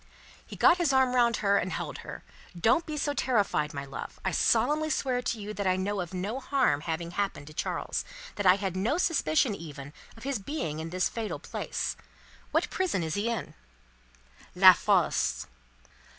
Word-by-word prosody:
He - - -10
got 360 -1 +5
his 335 -5 +2
arm 265 -1 +3
round 240 -2 +3
her, 200 0 +4
and 185 - -3
held - - -4
her. - - -9 0.4
"Don't 245 - +3
be 305 -1 -4
so 290 0 0
terrified, 205 - +1
my 140 0 -5
love. 135 -1 -8
I - - +1
solemnly 310 +1 +2
swear 255 -4 0
to 230 -2 -2
you 210 +1 -6
that 200 -2 -2
I 185 - +3
know 195 +1 -1
of 175 - -6
no 195 +7 -3
harm 260 - +1
having 170 +1 -4
happened 195 -6 -2
to 155 - -12
Charles; - - -2 0.3
that 205 -2 -1
I 180 - +8
had 195 -2 -3
no 215 - 0
suspicion 255 - +2
even 150 -6 -9 0.2
of 225 - -12
his 275 -4 -2
being 190 - -4
in 160 +1 -5
this 180 +1 +1
fatal 225 -2 -4
place. - - -4 0.5
What - - 0
prison 360 - 0
is 160 -1 -3
he 205 +5 -1
in?" 230 -5 -4 1.0
"La - - +9
Force!" - - +1
205 Hz, 185 wpm, -28 LUFS, 170-260 Hz, 1.0 s, La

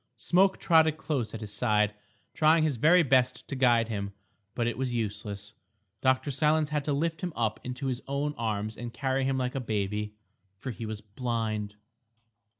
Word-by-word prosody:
Smoke 190 +2 +3
trotted 160 -2 +4
close 140 -8 -2
at 110 - -7
his 105 -1 -6
side, 105 -2 +2 0.4
trying 155 +1 +4
his 150 -5 +1
very 165 +8 +6
best 130 -2 +2
to 140 - -4
guide 120 -3 +4
him. 100 -3 -4 0.4
But 120 - 0
it 120 - 0
was 125 0 -2
useless. 105 -1 -4 0.5
Dr. 130 +2 +2
Silence 150 +2 +2
had 150 -1 -1
to 150 - 0
lift 160 +3 -1
him 180 - -2
up 110 -2 0
into 125 +2 -5
his 130 -1 -2
own 140 +2 -1
arms 110 -1 -2
and 120 0 -5
carry 135 +1 0
him 135 0 +1
like 125 -1 -1
a 135 - -2
baby. 105 -2 -2 0.4
For 130 +6 -5
he 115 0 -6
was 110 -1 -5
blind. 110 -1 -3
125 Hz, 180 wpm, -29 LUFS, 110-145 Hz, 0.5 s, very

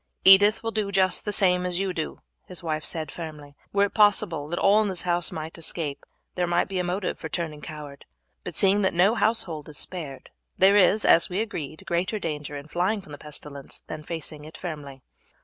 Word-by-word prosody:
"Edith 205 +4 +7
will 225 - -2
do 215 -3 -2
just 185 -2 +2
the 210 - -1
same 180 -3 +3
as 180 -1 -1
you 190 -1 -1
do," 160 -3 -5 0.3
his 180 -1 -4
wife 155 -2 -2
said 155 -2 -2
firmly. 150 -4 -8 0.2
"Were 200 0 +3
it 205 - -6
possible 205 -8 +3
that 175 +3 -3
all 205 +2 +5
in 215 - 0
this 185 -3 -2
house 175 -2 0
might 160 +2 -6
escape, 155 -3 -3 0.3
there 180 -1 -1
might 175 0 +1
be 190 -2 -3
a - - 0
motive 180 +2 -2
for 160 - -6
turning 155 -4 -4
coward, 150 -2 -9 0.4
but - - -6
seeing 200 +1 +3
that 190 -3 +1
no 190 +5 +5
household 210 -10 +2
is 150 - -6
spared, 150 -7 -5 0.3
there 195 +2 +6
is, 205 +2 +4
as 165 - +5
we 185 +2 -2
agreed, 160 -9 -4
greater 180 +5 -1
danger 150 -5 -4
in 140 +1 -9
flying 185 +7 0
from 155 - -14
the 145 - -9
pestilence 145 -2 -10
than 155 - -7
facing 155 -2 -5
it 155 +1 -11
firmly." 145 -6 -7
175 Hz, 210 wpm, -25 LUFS, 155-195 Hz, 0.4 s, Edith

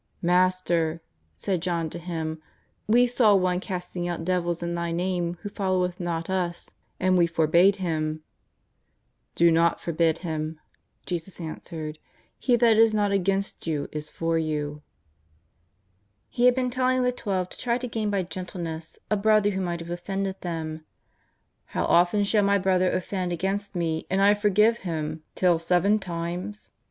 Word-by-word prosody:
Master,'' 175 -2 +2 0.4
said 180 - -2
John 170 -2 -1
to 175 - -6
Him, 160 -2 -4 0.2
" - - -43
we 245 - +6
saw 240 -4 +4
one 180 -1 +2
casting 180 -2 -4
out 170 -1 -3
devils 175 -1 0
in 170 0 -2
Thy 170 0 -2
I^ame 175 0 -1
who 205 - -4
followeth 185 -3 -1
not 170 -2 -2
us, 180 -2 -2 0.3
and 185 0 +3
we 170 - +5
forbade 170 +4 +4
him." 155 -4 -2 0.6
" - - -47
Do 170 0 +5
not 165 +1 +3
forbid 165 -1 +1
him," 155 -1 -3 0.5
Jesus 175 +1 -5
answered; 160 -1 -6 0.2
" - - -39
he 250 - +3
that 230 -2 +4
is 225 -1 +5
not 205 -1 +2
against 195 -1 -1
you 150 -3 -2
is 150 0 -5
for 165 0 -1
you." 150 -2 -3 1.5
He 240 - +1
had 250 0 +6
been 255 -1 0
telling 255 0 +1
the 250 - +2
Twelve 195 -7 -2
to - - -11
try 240 -1 0
to 250 0 -4
gain 220 -2 -2
by 200 -2 0
gentleness 170 -3 -6
a - - +4
brother 210 0 +3
who 190 -1 -2
might 175 -2 -2
have 170 +1 -7
offended 195 +2 -3
them. 160 -2 -4 0.4
" - - -46
How - - +2
often 175 +4 +4
shall 210 +1 +3
my 200 0 +3
brother 185 -1 +2
offend 185 0 -2
against 195 +4 -2
me 165 -2 -1
and 190 - +1
I 200 +1 +6
forgive 210 +2 +3
him? 155 -3 -4
till 175 -3 +3
seven 180 +5 +2
times 180 +3 -5
180 Hz, 165 wpm, -26 LUFS, 165-200 Hz, 1.5 s, we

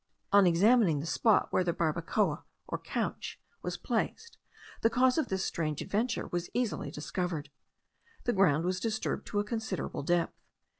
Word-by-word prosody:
On 200 -2 +7
examining 185 - +4
the 145 - -4
spot 215 +5 +3
where 185 - +3
the 175 -1 0
barbacoa, 170 +1 0 0.2
or - - -2
couch, - - -3 0.2
was - - -3
placed, 465 +1 -3 0.4
the 225 - +4
cause 255 +4 +3
of 315 - 0
this 190 0 -1
strange 155 -3 -2
adventure 225 +4 -1
was 175 0 -2
easily 240 -11 -1
discovered. 155 0 -3 0.7
The 240 - +1
ground 165 -5 +3
was 185 +1 0
disturbed 220 +1 -2
to 205 - -1
a - - +2
considerable 220 -3 -3
depth. 170 +3 +1
185 Hz, 155 wpm, -31 LUFS, 165-220 Hz, 0.7 s, On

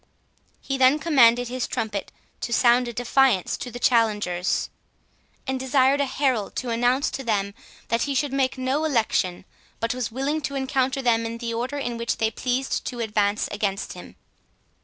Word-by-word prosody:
He 270 -1 -3
then 260 +3 +5
commanded 245 -7 +4
his 250 +1 -3
trumpet 210 -3 -3 0.3
to - - -4
sound 240 +1 +4
a 240 - -5
defiance 245 -4 +2
to 250 - -6
the 245 - -8
challengers, 210 -7 +1 0.7
and 265 -1 -2
desired 265 +1 +3
a 280 - +1
herald 260 -6 -1
to 250 -2 -3
announce 245 +4 +1
to 270 - -5
them, 200 -4 -1 0.4
that 230 0 +1
he 280 -1 -1
should 275 +1 0
make 265 -1 0
no 260 +4 0
election, 220 - 0 0.3
but 230 +1 -1
was 250 -3 -3
willing 275 +6 -1
to 280 -1 -4
encounter 265 0 0
them 230 -2 +2
in 230 0 -5
the 230 -1 -4
order 250 +5 -3
in 245 -4 -3
which 235 0 -1
they 220 0 +1
pleased 255 +4 -2
to 245 - -5
advance 210 -2 0
against 200 -1 -2
him. - - -12
245 Hz, 175 wpm, -24 LUFS, 225-265 Hz, 0.7 s, then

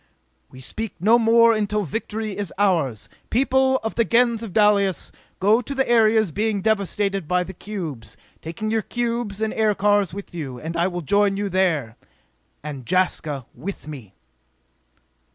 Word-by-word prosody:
We 130 - -13
speak 220 - -6
no 220 +7 +5
more 230 0 +5
until 210 -1 0
victory 215 +3 -4
is 200 -4 -4
ours! 165 - +1 0.2
People 265 +1 +3
of 225 - -2
the 230 - +2
Gens 235 0 +2
of 225 -4 -6
Dalis, 200 -2 +2 0.3
go 210 +5 +4
to 275 +4 -6
the 265 0 +1
areas 220 -4 +4
being 210 +3 0
devasted 200 -3 0
by 180 +1 +1
the 190 - -9
cubes, 160 - -7 0.2
taking 190 +7 -4
your 225 0 +1
cubes 235 -3 -3
and 220 - -1
aircars 205 -2 +2
with 200 +1 -9
you, 140 -7 -6
and 160 +4 -6
I 170 +2 +2
will 175 -1 -4
join 200 +4 +2
you 205 0 -2
there! 165 -11 0 0.7
_And 145 -4 -6
Jaska 155 -7 0
with 160 +4 -7
me! 125 -11 -10
200 Hz, 155 wpm, -22 LUFS, 170-220 Hz, 0.7 s, no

